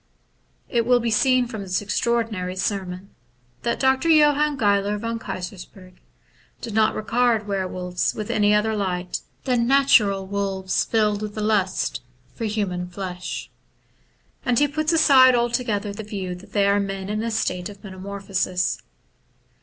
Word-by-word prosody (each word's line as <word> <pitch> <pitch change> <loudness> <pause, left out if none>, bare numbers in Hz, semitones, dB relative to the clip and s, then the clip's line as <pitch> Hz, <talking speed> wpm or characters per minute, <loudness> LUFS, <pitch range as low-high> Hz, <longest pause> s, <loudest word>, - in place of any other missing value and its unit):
'* - - -42 0.3
It 235 -1 0
will 245 -1 +5
be 230 -1 -1
seen 255 +3 +3
from 225 -3 -6
this 185 -2 -1
extraordinary 210 -3 -1
sermon 190 -1 -3 0.5
that 235 - -1
Dr. 265 +4 +2
Johann 300 -2 +4
Geiler 205 -2 +2
von 230 +2 -3
Keysersperg 185 -1 -8 0.7
did 230 -3 -6
not 215 0 +3
regard 230 0 +1
were 195 -2 -1
wolves 180 -1 -2
in 210 - -4
any 205 -1 +3
other 215 +1 +1
light 180 -3 -2 0.2
than 245 -3 +1
natural 220 -8 +4
wolves 195 -1 -1
filled 210 -2 +1
with 210 0 -6
a - - -2
lust 210 -3 0 0.3
for 230 - -4
human 195 -5 -2
flesh; 180 0 -6 0.9
and 245 -2 +1
he 290 - +4
puts 310 +2 -1
aside 270 -6 +6
altogether 235 -4 -1
the 210 - -6
view 195 -4 -5
that 180 +2 -12
they 200 -1 +3
are 200 0 +3
men 195 -1 -3
in 210 +1 -2
a 230 - -2
state 180 -5 -2
of 200 -1 -13
metamorphosis. 190 -1 -2
210 Hz, 155 wpm, -23 LUFS, 190-235 Hz, 0.9 s, aside